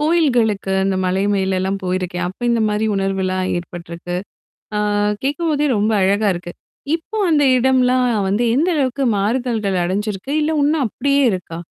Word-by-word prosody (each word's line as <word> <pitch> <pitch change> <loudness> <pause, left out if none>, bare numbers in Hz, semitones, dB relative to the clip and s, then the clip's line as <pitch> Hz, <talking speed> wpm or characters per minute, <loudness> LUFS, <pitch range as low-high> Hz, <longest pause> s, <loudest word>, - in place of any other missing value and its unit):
கோயில்களுக்கு 245 - +1
அந்த 195 0 +1
மலை 185 +1 0
மேலலாம் 190 0 0
போயிருக்கேன் 180 -1 -2
அப்ப 185 - -11
இந்த 235 -1 +1
மாதிரி 210 +1 0
உணர்வுலாம் 190 -1 -1
ஏற்பட்டிருக்கு. 175 0 -6 0.6
அ - - +1 0.4
கேட்கும்போதே 295 +1 0
ரொம்ப 210 +2 +1
அழகா 200 +2 +2
இருக்கு. 175 0 -7 0.4
இப்போ 375 +7 -7
அந்த 295 -2 +4
இடம்லாம் 255 0 +3 0.2
வந்து 205 +5 +1
எந்த 315 +7 +2
அளவுக்கு 270 -1 0
மாறுதல்கள் 220 -2 0
அடைஞ்சிருக்கு? 200 +6 -3
இல்ல 305 +1 0
இன்னும் 290 -1 +2
அப்படியே 280 +6 0
இருக்கா? 180 -3 -5
210 Hz, 140 wpm, -19 LUFS, 190-265 Hz, 0.6 s, அந்த